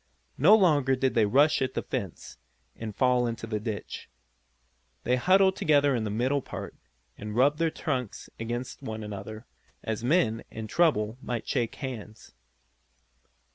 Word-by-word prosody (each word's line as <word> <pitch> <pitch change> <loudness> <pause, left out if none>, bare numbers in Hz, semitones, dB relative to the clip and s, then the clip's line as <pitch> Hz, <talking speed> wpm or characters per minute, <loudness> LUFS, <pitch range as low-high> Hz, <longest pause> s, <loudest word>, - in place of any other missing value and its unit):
No 180 +11 +8
longer 145 -10 +3
did 130 0 0
they 110 -3 +3
rush 140 +8 +4
at 130 -1 -1
the - - -1
fence, 100 - -6 0.4
and 110 -2 -7
fall 125 -1 +2
into 115 -1 -4
the 110 -1 -3
ditch. 105 -1 -6 0.9
They 125 - +2
huddled 190 +8 +4
together 145 -2 +3
in 115 -2 -1
the - - -2
middle 130 +7 0
part, - - -7 0.5
and 105 0 -6
rubbed 140 +5 +3
their 165 0 +2
trunks 130 -8 -4
against 120 +4 -5
one 110 -4 -5
another, 105 +2 -7 0.4
as 110 0 -3
men, 120 -5 +2
in 110 0 -7
trouble, 110 -4 +1
might 120 -2 -4
shake 120 -4 -1
hands. 115 -5 -8
125 Hz, 150 wpm, -28 LUFS, 110-140 Hz, 0.9 s, No